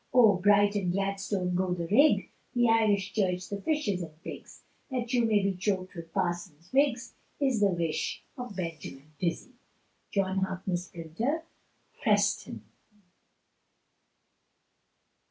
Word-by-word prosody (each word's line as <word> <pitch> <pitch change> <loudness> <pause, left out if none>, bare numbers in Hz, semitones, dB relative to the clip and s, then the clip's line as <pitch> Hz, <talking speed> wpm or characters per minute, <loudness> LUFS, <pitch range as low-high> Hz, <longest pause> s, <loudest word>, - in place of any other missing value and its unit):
Oh, 225 -7 +6
Bright 205 +1 +4
and 195 -4 0
Gladstone 195 -1 -1
go 180 0 +1
the 170 -1 -3
rig, 270 - +4 0.2
The 240 0 +4
Irish 210 -4 +3
Church 185 -3 0
the 200 -1 -4
fishes 285 - 0
and 155 -2 -8
pigs, - - -9 0.3
That 245 -2 -3
you 240 -2 +3
may 210 -3 +3
be 195 0 +1
choked 185 0 -2
with 165 -2 -9
Parsons' 175 -2 -3
wigs, 265 -3 +2 0.3
Is 265 -6 +2
the 205 -1 +4
wish 170 -3 -2
of 245 -5 -7
Benjamin 155 -4 -6
Dizzy. 180 +8 -2 0.6
John 195 -1 +1
Harkness, 185 -1 -2
Printer, 195 - -3 0.6
Preston. 205 - +1
195 Hz, 125 wpm, -29 LUFS, 180-220 Hz, 0.6 s, Oh